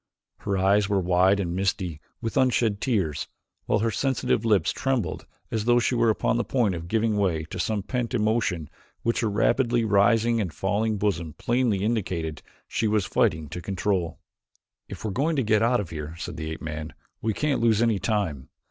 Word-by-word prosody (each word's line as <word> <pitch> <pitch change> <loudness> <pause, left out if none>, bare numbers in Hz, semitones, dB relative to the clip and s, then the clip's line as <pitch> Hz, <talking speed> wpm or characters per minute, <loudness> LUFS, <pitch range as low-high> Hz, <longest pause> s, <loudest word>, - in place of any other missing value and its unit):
Her 100 -1 -1
eyes 100 +2 +3
were 100 -1 +2
wide 90 +2 +3
and 85 -3 -2
misty 90 -4 -1 0.2
with 115 -1 -3
unshed 120 -5 +2
tears, 95 - 0 0.4
while - - +3
her 115 +2 0
sensitive 130 -3 0
lips 105 -4 +3
trembled 130 -9 -2 0.2
as 110 -2 -1
though 120 0 +4
she 120 - +2
were 115 -1 +3
upon 110 +1 +1
the 120 - +1
point 115 -7 +1
of 85 -1 -6
giving 110 +1 +1
way 90 -6 +1
to - - -5
some 105 +2 -1
pent 125 +1 -2
emotion 105 -8 0 0.4
which 115 - +1
her 115 - +1
rapidly 120 +3 +2
rising 115 +3 +3
and 90 -7 -4
falling 105 +2 0
bosom 85 -6 -1
plainly 120 - 0
indicated 90 -8 -2 0.3
she 110 - 0
was 105 -2 +1
fighting 80 -3 +1
to 90 - -6
control. 95 -3 -1 0.7
"If - - -8
we 110 - -1
are - - -3
going 150 +10 0
to 135 - +1
get 105 -1 +3
out 120 +2 +3
of 95 - -5
here," 75 0 -6
said 90 0 -6
the 80 -1 -5
ape 80 - -6
man, 80 0 -5 0.3
"we 110 -2 -1
can't 150 -4 0
lose 115 -2 +3
any 115 -4 +2
time. 80 - -1
105 Hz, 195 wpm, -25 LUFS, 90-115 Hz, 0.7 s, though